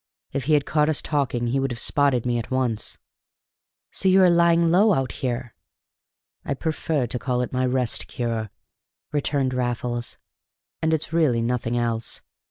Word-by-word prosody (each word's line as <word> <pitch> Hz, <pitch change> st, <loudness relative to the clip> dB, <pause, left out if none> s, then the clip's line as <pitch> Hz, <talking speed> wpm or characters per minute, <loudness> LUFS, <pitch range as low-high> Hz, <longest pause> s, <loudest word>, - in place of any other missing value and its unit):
If 135 Hz, -3 st, -2 dB
he 155 Hz, -, +2 dB
had 145 Hz, -2 st, +3 dB
caught 150 Hz, 0 st, +2 dB
us 155 Hz, -, +1 dB
talking 135 Hz, -5 st, -1 dB
he 125 Hz, +3 st, 0 dB
would 135 Hz, -1 st, -1 dB
have 120 Hz, -, -4 dB
spotted 135 Hz, -1 st, +2 dB
me 120 Hz, -1 st, +1 dB
at 115 Hz, -, -6 dB
once." 125 Hz, -4 st, -1 dB, 0.9 s
"So 190 Hz, -, +1 dB
you 190 Hz, 0 st, +6 dB
are 180 Hz, -, +6 dB
lying 170 Hz, -1 st, +4 dB
low 200 Hz, +3 st, +5 dB
out 135 Hz, -1 st, -1 dB
here!" 120 Hz, -2 st, -3 dB, 0.9 s
"I 140 Hz, -, -2 dB
prefer 155 Hz, -2 st, -1 dB
to 120 Hz, +1 st, -3 dB
call 125 Hz, +1 st, -1 dB
it 125 Hz, -, -4 dB
my 130 Hz, 0 st, +1 dB
Rest 125 Hz, -2 st, 0 dB
Cure," 115 Hz, -3 st, -3 dB, 0.6 s
returned 140 Hz, -3 st, 0 dB
Raffles, 120 Hz, -1 st, -1 dB, 0.6 s
"and 160 Hz, -, +1 dB
it's 160 Hz, 0 st, -1 dB
really 140 Hz, -9 st, +2 dB
nothing 120 Hz, 0 st, -1 dB
else. 115 Hz, -2 st, -2 dB
130 Hz, 170 wpm, -24 LUFS, 120-150 Hz, 0.9 s, you